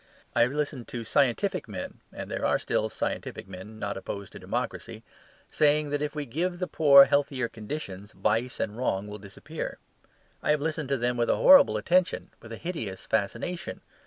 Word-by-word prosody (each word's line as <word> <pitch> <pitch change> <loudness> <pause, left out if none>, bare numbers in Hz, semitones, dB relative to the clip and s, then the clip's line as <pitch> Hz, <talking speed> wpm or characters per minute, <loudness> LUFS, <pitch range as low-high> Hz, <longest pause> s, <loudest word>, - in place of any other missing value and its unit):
I - - +4
have 120 +2 +4
listened 145 -4 -3
to 120 -1 -5
scientific 140 - +1
men 95 -4 -7
(and - - -7
there - - -3
are - - +3
still - - -1
scientific - - -4
men 95 +3 -10
not 100 -2 -3
opposed 100 0 -6
to - - -10
democracy) - - -4 0.5
saying 150 0 +3
that 145 0 -1
if 150 +1 -3
we 150 -1 -3
give 175 +8 -2
the 180 - -1
poor 140 -5 +8
healthier 140 -4 +1
conditions 105 -4 -7
vice 115 +4 0
and 105 - -2
wrong 105 -5 -1
will 105 0 -7
disappear. 100 0 -7 0.6
I - - -3
have 150 0 +4
listened 155 -1 -2
to 140 - +1
them 120 0 0
with 120 0 +1
a - - +4
horrible 275 - +7
attention, 180 +11 +1
with 110 - -12
a 115 - -6
hideous 115 - -5
fascination. 170 - -2
125 Hz, 185 wpm, -27 LUFS, 105-150 Hz, 0.6 s, poor